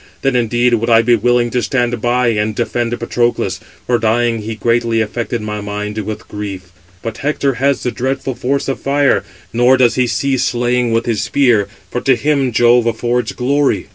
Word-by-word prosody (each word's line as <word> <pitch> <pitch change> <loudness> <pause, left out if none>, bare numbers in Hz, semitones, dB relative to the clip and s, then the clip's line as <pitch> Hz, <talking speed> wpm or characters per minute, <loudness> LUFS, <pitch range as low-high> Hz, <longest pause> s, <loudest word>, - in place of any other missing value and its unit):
Then 135 -2 +1
indeed 120 +1 +2
would 115 +1 +1
I 115 0 +5
be 120 +1 +4
willing 120 +1 +1
to 125 - 0
stand 120 0 -1
by 120 0 +2
and 105 -1 -1
defend 120 +1 -2
Patroclus; 120 0 -1 0.3
for 120 -1 +1
dying, 115 +1 +1
he 110 +1 -5
greatly 115 0 +1
affected 115 +1 -2
my 105 0 -4
mind 105 +1 -4
with 105 0 -6
grief. 100 -3 -7 0.3
But 115 -1 -5
Hector 140 -1 0
has 140 0 +1
the 125 - -1
dreadful 135 +2 -2
force 135 +3 -2
of 135 - -2
fire, 140 0 +2 0.3
nor 120 +3 +4
does 125 -2 +4
he 125 -1 +2
cease 135 +1 0
slaying 120 0 0
with 115 +1 +1
his 115 -3 -1
spear; 115 -3 +2 0.2
for 125 - -2
to 135 - +3
him 135 +1 0
Jove 120 +1 +4
affords 120 0 -1
glory." 140 +3 0
120 Hz, 185 wpm, -16 LUFS, 115-125 Hz, 0.3 s, I